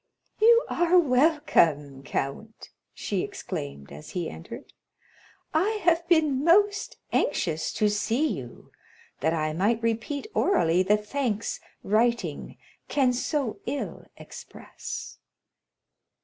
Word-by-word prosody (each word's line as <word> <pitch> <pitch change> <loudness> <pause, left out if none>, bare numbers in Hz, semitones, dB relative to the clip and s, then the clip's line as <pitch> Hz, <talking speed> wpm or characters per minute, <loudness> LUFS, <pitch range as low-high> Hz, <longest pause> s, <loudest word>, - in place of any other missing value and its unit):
"You 465 +2 +6
are 345 +1 +3
welcome, 250 - +2
count!" 140 0 -5 0.2
she - - -3
exclaimed, 70 0 -6
as 75 +1 -10
he 170 -3 -2
entered. 80 - -10 0.8
"I 410 +7 +1
have 340 0 +2
been 305 -6 +3
most 410 +7 +3 0.2
anxious 160 -2 0
to 215 - +2
see 220 +7 0
you, - - -7 0.5
that 160 +1 +1
I 155 -1 -1
might 215 +7 +1
repeat 230 +5 -2
orally 175 - +3
the 205 +3 +3
thanks 225 0 -2 0.2
writing 235 +3 0 0.3
can 260 -3 +2
so 260 -1 -2
ill 285 - -4
express." - - -9
235 Hz, 105 wpm, -26 LUFS, -, 0.8 s, You